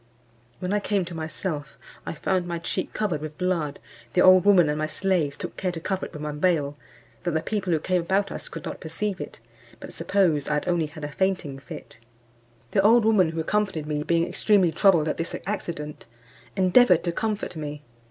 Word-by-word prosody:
When 180 +7 -3
I 210 - +3
came 200 -2 0
to 170 - -8
myself, 160 -1 -4 0.3
I - - -2
found 180 +2 0
my 170 -1 -2
cheek 165 - -3
covered 185 -9 -1
with 155 0 -7
blood: 175 -6 -1 0.3
the 180 - +4
old 185 0 +7
woman 190 -5 +6
and 150 +1 -1
my 155 - 0
slaves 165 -5 0
took - - -6
care 185 -1 -1
to 170 - -6
cover 190 +3 -2
it - - -20
with 150 -1 -7
my 150 - -2
veil, 150 -2 +1 0.5
that 175 -2 -2
the 160 - +2
people 200 -4 -2
who 165 - +4
came 180 +3 0
about 195 +3 0
us - - -6
could - - -8
not - - -5
perceive 185 +4 -3
it, - - -8 0.4
but - - -9
supposed 170 -8 +1
I 150 - +2
had 150 - -2
only 170 -3 +1
had 155 0 -11
a - - -1
fainting 180 -6 -1
fit. 135 - -10 0.7
The 195 - +3
old 225 +3 +5
woman 205 -6 +4
who 165 0 -4
accompanied 190 -2 0
me 150 -1 -2
being 170 +2 +1
extremely 195 -6 +3
troubled 170 -2 +4
at - - -1
this 165 - -3
accident, 165 - -5 0.5
endeavoured 185 0 +5
to 170 - 0
comfort 210 0 -2
me. 150 -1 -6
175 Hz, 205 wpm, -25 LUFS, 155-190 Hz, 0.7 s, old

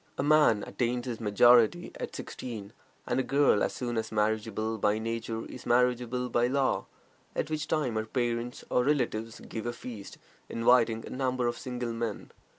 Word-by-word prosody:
A - - 0
man 150 -8 +4
"attains 120 0 -1
his 120 -3 -4
majority" 120 - +5
at - - -5
sixteen, 110 -4 -7 0.3
and - - 0
a - - +2
girl 140 -7 +3
as - - 0
soon 120 -2 -3
as 110 0 -5
marriageable 110 +1 -1
by 105 +1 +2
nature 115 0 -3
is 125 - -10
marriageable 125 0 +2
by 120 0 +2
law, 135 +1 0 0.5
at 155 - -2
which 155 0 -2
time 150 -7 0
her 110 0 -2
parents 120 0 -2
or 125 - +3
relatives 115 -5 -1
give 110 0 -6
a 120 - -2
feast, 115 -4 -9 0.3
inviting 115 -1 +3
a - - -9
number 130 -1 -1
of 120 - 0
single 125 -2 -4
men. 115 -2 -4
120 Hz, 170 wpm, -29 LUFS, 110-125 Hz, 0.5 s, majority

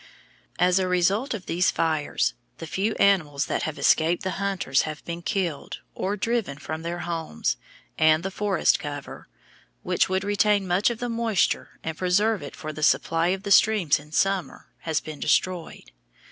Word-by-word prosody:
As 180 +1 +3
a 185 - 0
result 195 +8 +1
of 190 - -8
these 180 +2 +1
fires, 155 -3 0 0.2
the 165 - -7
few 200 +7 -1
animals 155 -8 +2
that - - -2
have 155 - -8
escaped 165 +2 +3
the 190 - -1
hunters 190 -9 +1
have 155 -1 -6
been 170 0 -5
killed 175 -6 -3
or 200 +2 -2
driven 225 -8 -1
from 155 +2 -6
their 170 +1 -4
homes, 165 - -2 0.4
and 155 +1 +4
the 195 - -3
forest 195 -3 +1
cover, 145 -1 -7 0.6
which - - +1
would 190 +1 0
retain 205 -1 +2
much 180 +5 +2
of 235 - -4
the 245 - -3
moisture 230 -4 0
and 160 0 -5
preserve 200 +4 +2
it - - -8
for 155 -3 -6
the 155 - -8
supply 165 +2 +2
of 190 +2 -1
the 200 - -4
streams 195 -7 +4
in 150 +1 -16
summer, 195 +3 -1
has 160 -2 -1
been 155 -2 -8
destroyed. 175 +2 -1
180 Hz, 175 wpm, -25 LUFS, 155-200 Hz, 0.6 s, and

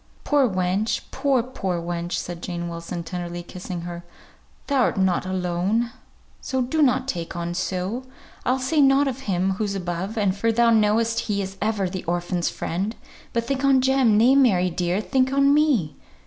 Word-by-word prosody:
"Poor 285 -4 +3
wench! 185 +3 0
poor, 265 -3 +1
poor 190 -8 -3
wench!" 170 +1 -4
said 175 -1 -4
Jane 175 -1 -4
Wilson, 170 +1 -5
tenderly 175 0 -5
kissing 180 0 -7
her. 175 0 -7 0.6
"Thou'rt 270 -6 +1
not 185 -1 +1
alone, 185 +5 0 0.5
so 260 - -2
donnot 260 -1 +2
take 170 -9 -4
on 170 0 -3
so. 185 +7 -3 0.4
I'll 255 - +1
say 265 +4 +1
nought 275 +1 +5
of 265 -1 -3
Him 185 +1 +1
who's 200 +1 -2
above, 185 +4 -4 0.2
for 225 +3 +1
thou 235 +1 +4
know'st 225 +1 +3
He 200 -1 +1
is 195 0 -4
ever 210 -2 0
the 185 0 -5
orphan's 175 0 -1
friend; 195 +7 -3 0.4
but 235 -1 -1
think 270 +2 -2
on 275 -1 +5
Jem! 260 -4 +3
nay, 240 +5 +5
Mary, 195 -10 +4
dear, 175 +3 0
think 260 +3 +1
on 275 +1 +4
me! 275 - +2
200 Hz, 165 wpm, -23 LUFS, 175-255 Hz, 0.6 s, nought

